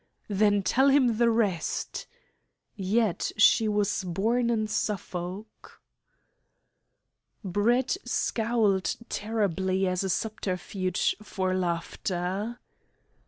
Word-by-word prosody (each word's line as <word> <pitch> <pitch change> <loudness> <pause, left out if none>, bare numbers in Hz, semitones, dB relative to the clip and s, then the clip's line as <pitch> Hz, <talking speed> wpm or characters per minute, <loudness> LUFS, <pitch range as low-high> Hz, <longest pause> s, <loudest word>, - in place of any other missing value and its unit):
"Then 205 0 +2
tell 265 +7 +3
him 260 -5 +4
the 235 -1 +5
rest!". 205 -8 -1 0.7
(Yet 205 0 0
she 220 0 +5
was 205 -2 0
born 225 +7 0
in 220 -2 +1
Suffolk.) 200 -1 -5 1.6
Brett 220 +7 +1
scowled 225 -4 +1
terribly 195 -3 0
as 185 0 0
a 190 - -2
subterfuge 185 -2 -1
for 190 -3 -2
laughter. 185 +4 -2
205 Hz, 85 wpm, -27 LUFS, 185-225 Hz, 1.6 s, the